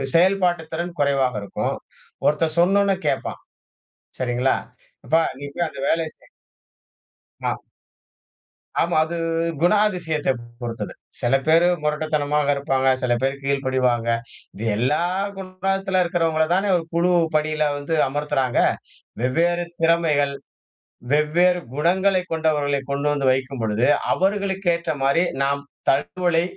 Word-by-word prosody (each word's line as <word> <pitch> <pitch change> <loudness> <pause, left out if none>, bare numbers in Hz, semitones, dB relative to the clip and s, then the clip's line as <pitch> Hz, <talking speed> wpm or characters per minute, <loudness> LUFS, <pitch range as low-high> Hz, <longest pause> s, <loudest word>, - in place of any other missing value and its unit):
செயல்பாட்டுத் 175 -2 +2
திறன் 170 +1 -4
குறைவாக 135 -4 +2
இருக்கும். - - -2 0.5
ஒருத்தன் 155 +2 +2
சொன்னொன்னே 195 +2 +4
கேப்பான். - - -2 0.8
சரிங்களா? 125 +1 +1 0.5
அப்ப 160 - +1 0.2
நீ 145 - -6
போய் 170 -1 0
அந்த 135 - -10
வேலைய 165 -1 +1
செய் - - -23 1.2
ஆ. - - 0 1.2
ஆமா 170 -1 +1
அது 170 +2 -5 0.5
குணாதிசயத்தை 175 -7 +2 0.3
பொறுத்தது. 115 -1 -4 0.3
சில 120 +3 +2
பேர் 165 +2 +5 0.2
மொரட்டுத்தனமாக 150 -1 0
இருப்பாங்க. 135 -2 +1
சில 125 -1 +1
பேரு 135 +1 +1
கீழ்படிவாங்க. 130 -4 +1 0.5
இது 110 - -6
எல்லா 145 +8 +1 0.4
குணத்தில 190 0 -1
இருக்கிறவங்கள 165 -2 +1
தானே 195 +2 +1
ஒரு 165 - -5
குழு 175 +2 +3 0.2
பணியில 155 0 +1
வந்து 145 +3 -3
அமர்த்துறாங்க. 145 -3 -1 0.6
வெவ்வேறு 170 +7 +1 0.2
திறமைகள், 160 -4 +2 0.8
வெவ்வேறு 175 +4 +3 0.2
குணங்களைக் 185 +3 +1
கொண்டவர்களை 145 -3 +1
கொண்டு 140 +1 -1
வந்து 135 -2 +1
வைக்கும் 130 -1 -3
பொழுது, 110 +4 +1 0.3
அவர்களுக்கு 195 -1 -1
ஏற்ற 170 - -3
மாரி 140 +6 +3 0.2
நாம் 140 +1 0 0.3
தகவலை 170 +4 +1
155 Hz, 115 wpm, -22 LUFS, 140-175 Hz, 1.2 s, பேர்